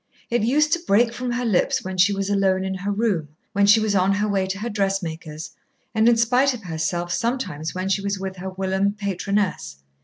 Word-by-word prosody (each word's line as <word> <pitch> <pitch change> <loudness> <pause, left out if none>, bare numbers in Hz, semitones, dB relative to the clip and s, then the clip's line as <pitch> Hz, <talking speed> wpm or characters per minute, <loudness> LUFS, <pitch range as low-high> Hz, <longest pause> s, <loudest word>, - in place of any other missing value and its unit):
It 240 - +2
used 295 +7 +2
to 345 - +2
break 230 +4 +3
from 250 +1 -3
her 245 +1 -2
lips 210 -6 +1
when 190 0 -5
she 185 +2 +4
was 195 -1 -2
alone 195 -2 +2
in 190 0 -2
her 195 +2 -3
room, 200 -7 0 0.3
when 200 0 +3
she 210 +2 +7
was 215 -1 0
on 195 0 +3
her 205 +1 0
way 195 -2 0
to 190 +1 -3
her 215 +4 -4
dressmaker's, 170 -7 -3 0.4
and 220 +1 +4
in 235 - +4
spite 250 +4 +3
of 220 - -11
herself, 175 +1 -2
sometimes 230 - -2
when 185 +1 -2
she 195 +1 +1
was 200 0 -2
with 190 0 -5
her 190 +1 -5
whilom 190 +1 0
patroness. 195 - -2
195 Hz, 215 wpm, -23 LUFS, 185-220 Hz, 0.4 s, she